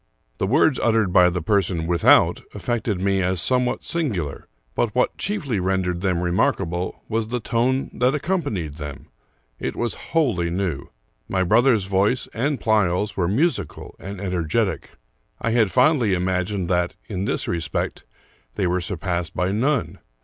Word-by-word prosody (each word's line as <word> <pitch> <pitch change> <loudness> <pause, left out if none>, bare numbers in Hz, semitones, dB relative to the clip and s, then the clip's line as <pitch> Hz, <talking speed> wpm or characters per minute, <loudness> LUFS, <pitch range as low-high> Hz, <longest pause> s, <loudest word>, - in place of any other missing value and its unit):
The 95 - 0
words 140 +3 +3
ut 115 -1 +2
tered 110 -5 +2
by 90 -1 +6
the 90 -1 -3
person 90 -3 +1
without 85 0 +4
affected 115 -5 -2
me 95 0 +1
as 90 0 0
somewhat 125 +6 0
singular; 100 - -3 0.3
but 115 -3 -1
what 125 - +2
chiefly 155 - -2
rendered 90 -1 0
them 90 -3 0
remarkable 90 0 0
was 110 0 -1
the 125 +2 -2
tone 125 +4 0
that 125 +3 +2
accompanied 140 - -2
them. 75 -3 -8 0.5
It - - -3
was 120 -1 -1 0.2
wholly 115 - +1
new. 85 -5 -2 0.4
My 95 -1 +1
brother's 115 +3 +4
voice 100 +6 +1
and 140 +4 -1
Pleyel's 105 -2 +1
were 90 -3 +1
musical 105 - -1
and 100 0 -7
energetic. 90 -5 -1 0.4
I 115 - -1
had 115 -3 +3
fondly 125 - +3
imagined 90 +1 -1
that, 90 0 0
in 95 -3 -3
this - - -1
respect, 80 -3 -2 0.5
they - - 0
were 90 +1 +1
sur 85 +2 -2
passed 85 -1 -2
by 90 +1 0
none. 125 +5 0
95 Hz, 155 wpm, -23 LUFS, 90-120 Hz, 0.5 s, by